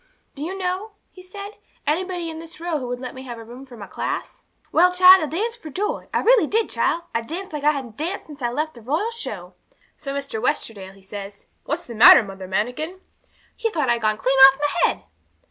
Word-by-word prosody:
Do 285 - -7
you 370 +5 -4
know," 380 +3 -3 0.2
he 370 - -14
said, 400 +3 -9 0.3
"anybody 350 +3 -1
in 320 - -8
this 330 0 -11
row 335 -2 -2
who 255 - -5
would 245 0 -4
let 255 -1 -6
me 260 - -9
have 245 -3 -8
a 230 - -9
room 245 +4 -12
for 245 -2 -13
my 205 - -8
class?" - - -5 0.3
'Well, 360 +3 +5
child, 365 +1 +8
I 310 - -1
danced 455 +10 -3
for 315 - -8
joy; 420 - -3
I - - +1
really 465 -8 +5
did, 445 +5 0
child. 340 - 0
I 230 - 0
danced 335 +9 -7
like 295 -1 -4
I 300 - +5
hadn't 260 -7 -6
danced 345 +6 -3
since 295 -2 -12
I 240 - 0
left 305 +6 -2
the 235 - -13
Royal 315 - -1
Show. 465 - -7 0.4
So 275 -1 -6
Mr. 275 -6 -4
Westerdale, 210 -8 -2
he 195 - -20
says, 200 0 -9 0.2
"What's 335 +4 -3
the 235 - -8
matter, 225 +1 +9
Mother 195 -2 -9
Manikin?" 250 - -2 0.6
He 455 - -1
thought 300 - 0
I'd 235 -1 0
gone 215 -1 +1
clean 260 +4 +1
off 270 - -14
my 290 0 +2
head! - - -6
300 Hz, 230 wpm, -22 LUFS, 240-365 Hz, 0.6 s, matter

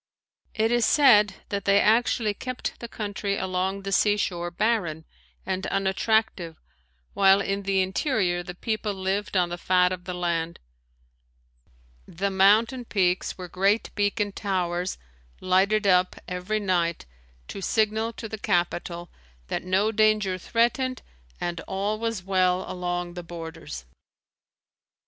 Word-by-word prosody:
It 220 +1 +1
is 240 -1 +3
said 210 -8 +5
that 200 -1 -3
they 200 0 +5
actually 220 0 +2
kept 255 +4 -5
the 235 - -6
country 205 -2 -3
along 190 +1 -2
the 195 - -4
sea 205 +2 +3
shore 175 -3 -2
barren 175 -5 -1 0.4
and 190 0 -2
unattractive 195 -3 0 0.5
while 195 0 +5
in 200 0 -1
the 195 -1 +1
interior 190 - 0
the 175 0 -8
people 215 +1 -2
lived 190 +1 -1
on 175 -1 +2
the 175 0 -5
fat 180 0 +3
of 180 -1 -5
the 180 -1 -4
land. 170 -1 -2 1.5
The 195 +4 -2
mountain 215 +6 +4
peaks 185 -5 0
were 180 -1 -7
great 195 +5 +1
beacon 205 0 0
towers 180 -3 -2 0.4
lighted 195 +3 +2
up 185 -1 +3
every 180 +4 -2
night 175 -4 0 0.4
to 195 - -6
signal 220 +2 +1
to 225 - -7
the 220 0 -7
capital 175 -3 -1 0.4
that - - -2
no 190 +4 +1
danger 215 -3 +2
threatened 240 +5 0 0.4
and 175 -1 -3
all 200 +3 -2
was 225 -4 -2
well 185 -1 +1
along 175 -1 -3
the 175 - -6
borders. 165 - -8
195 Hz, 135 wpm, -26 LUFS, 180-215 Hz, 1.5 s, said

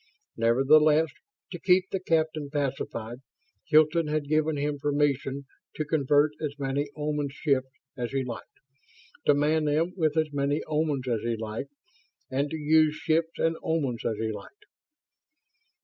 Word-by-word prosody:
Nevertheless, 150 +7 +4 0.4
to - - -6
keep 185 0 +3
the 195 - -1
captain 160 -4 0
pacified, 130 -5 -3 0.5
Hilton 155 +1 +4
had 150 -1 -1
given 155 0 +1
him 145 0 -2
permission 140 -1 0 0.3
to 155 - -2
convert 145 0 +3
as 145 -2 -3
many 140 +1 -2
Oman 150 -1 -1
ships 135 -2 0 0.3
as 120 -2 -3
he 135 -1 -1
liked; 120 -3 -6 0.8
to 145 - +6
man 150 +2 +2
them 160 +4 +1
with 160 -4 0
as 155 -2 +1
many 145 +1 0
Omans 150 -4 -1
as 115 -3 0
he 115 0 -1
liked; 110 0 -5 0.6
and 140 +2 0
to 160 - -4
use 155 0 +3
ships 165 +1 0
and 165 0 +1
Omans 140 -8 -1
as 110 -2 -1
he 110 0 -2
liked. 410 - -11
150 Hz, 150 wpm, -27 LUFS, 135-155 Hz, 0.8 s, to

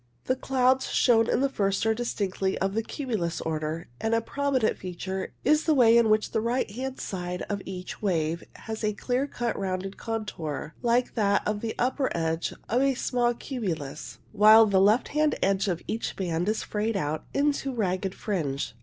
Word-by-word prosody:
The 255 - +1
clouds 260 0 +2
shown 230 -2 +4
in - - +2
the 275 - +3
first 195 -6 0
are 225 - +3
distinctly 200 -5 -2
of 195 0 -1
the 225 - +1
cumulus 220 - -3
order, 155 +1 -3
and 225 +1 +1
a 230 - +2
prominent 270 -1 0
feature 190 +1 -5
is 305 +3 +4
the 315 - +3
way 235 -3 +6
in 235 -2 +5
which 215 0 +2
the 220 - 0
right 240 +3 0
hand 260 +4 -5
side 180 -1 -4
of 200 -1 -3
each 185 -1 -7
wave 170 -4 0
has 220 0 -6
a 210 0 +1
clear 250 +6 -1
cut 240 -4 -2
rounded 190 0 -3
contour 170 -10 -4
like 240 +1 +2
that 205 -3 +1
of 210 0 -1
the 225 -1 -3
upper 260 +2 +1
edge 165 0 -1 0.2
of 245 +4 +2
a 275 -1 +2
small 240 -1 +1
cumulus, 155 - -5
while 215 +1 +8
the 195 -3 +3
left 210 +5 +4
hand 300 0 +2
edge 195 +1 +2
of 175 -3 -2
each 225 - -3
band 175 0 -1
is 215 - -1
frayed 215 0 -1
out 150 -3 -2
into 285 -1 +1
a 260 - -4
ragged 190 -3 -1
fringe. 145 - -2
215 Hz, 190 wpm, -27 LUFS, 185-245 Hz, 0.2 s, while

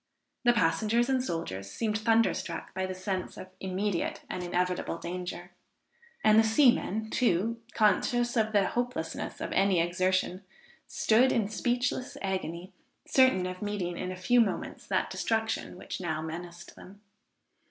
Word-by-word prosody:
The 240 - +6
passengers 215 +6 +2
and 260 -1 +2
soldiers 100 - -4
seemed 215 - -1
thunderstruck 225 +1 +1
by 190 0 -2
the 185 - -5
sense 185 0 -4
of 185 - -9
immediate 190 0 -2
and 180 - -3
inevitable 180 -1 -1
danger, 180 +1 -6 0.7
and 215 0 +6
the - - +6
seamen, 220 -3 +3
too 230 0 +1
conscious 240 +3 +2
of 220 -2 +2
the 205 -2 +3
hopelessness 245 -9 -3
of - - -4
any 195 -2 +3
exertion, 185 +2 0 0.4
stood 260 -4 +3
in 215 -4 +1
speechless 245 +3 -1
agony, 185 -1 -3 0.3
certain 260 -9 +4
of 185 0 -5
meeting 205 -4 -2
in 185 - -4
a - - -5
few 245 +6 +4
moments 210 -4 -2
that - - 0
destruction 225 -4 -1
which 190 - -6
now 160 -3 -2
menaced 170 +2 -8
them. 200 +2 -14
195 Hz, 140 wpm, -29 LUFS, 180-225 Hz, 0.7 s, The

